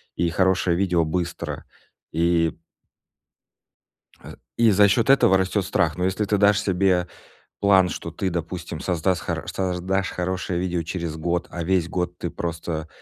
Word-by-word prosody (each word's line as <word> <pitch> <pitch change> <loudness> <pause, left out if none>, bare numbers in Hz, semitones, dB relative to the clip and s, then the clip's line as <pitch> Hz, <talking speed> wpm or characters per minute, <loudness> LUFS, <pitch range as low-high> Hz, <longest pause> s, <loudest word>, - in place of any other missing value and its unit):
и 85 0 +1
хорошее 95 0 +2
видео 90 -3 +2
быстро, 85 +2 -3 0.5
и 85 0 +2 1.7
э, - - -11 0.2
и 115 -1 +5
за 100 +1 +5
счёт 115 +5 +2
этого 135 -8 +5
растёт 95 +1 0
страх. 85 -4 0
Но 90 - -1
если 95 +3 0
ты 105 +1 +1
дашь 100 0 +4
себе 95 -3 +1 0.5
план, 95 -2 +4
что 85 - -6
ты, 95 +3 -2
допустим, 85 -1 -5
создаст 90 +1 0
хоро - - -4
создашь 95 0 -1
хорошее 90 -1 -2
видео 90 -2 -1
через 85 -1 -4
год, 85 +2 -1
а 85 - -5
весь 90 -1 +1
год 90 -1 -3
ты 85 - -4
просто 85 -2 -4
90 Hz, 150 wpm, -23 LUFS, 85-95 Hz, 1.7 s, и